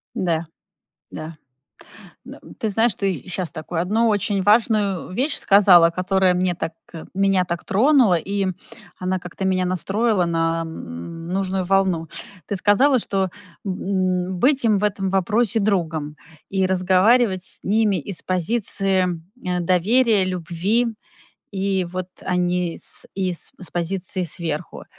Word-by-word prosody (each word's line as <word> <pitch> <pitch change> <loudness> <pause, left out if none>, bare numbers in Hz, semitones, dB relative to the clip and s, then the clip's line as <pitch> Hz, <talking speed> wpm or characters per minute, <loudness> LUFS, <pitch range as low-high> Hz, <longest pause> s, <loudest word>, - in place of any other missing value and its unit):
Да, 170 -2 -1 0.7
да. 155 +1 -7 0.9
Н - - -9
э, - - -14 0.2
ты 220 - -1
знаешь, 225 +1 +2
ты 190 -9 -2
щас 185 -2 -3
такую 165 +1 -4
одну 220 +6 +1
очень 205 -1 0
важную 205 -3 +2
вещь 275 +8 0
сказала, 185 -4 +6
которая 185 +1 +2
мне 180 0 0
так 165 -1 -4 0.2
э, 165 - -8
меня 195 -1 +2
так 170 0 -4
тронула, 235 0 +4
и 195 +2 -2 0.5
она 185 0 -1
как-то 180 +2 -7
меня 185 -1 +1
настроила 195 +3 +1
на, 165 0 0
м, 160 - -8
нужную 190 0 -1
волну. 185 -4 +1 0.4
Ты 200 - -2
сказала, 250 +8 +4
что 195 -3 -1 0.3
б 195 - -3 0.6
м, 185 -1 -4
быть 270 +2 +3
им 215 -3 +3
в 210 - -2
этом 195 -2 -1
вопросе 215 +4 +1
другом 160 -7 -1 0.3
и 190 -1 +1
разговаривать 190 +2 +3
с - - -4
ними 210 -1 +2
из 180 +3 -5
позиции, 190 0 0 0.4
а, 180 -1 0
доверия, 200 +4 +3
любви. 185 +6 0 0.7
И 195 -1 0
вот, 180 +1 -5 0.2
а, 180 - -1
не 180 -1 -1
с - - -3
из 185 -3 -3
с 180 - -5
позиции 180 +1 -2
сверху. 160 -2 -4
185 Hz, 140 wpm, -21 LUFS, 175-205 Hz, 0.9 s, сказала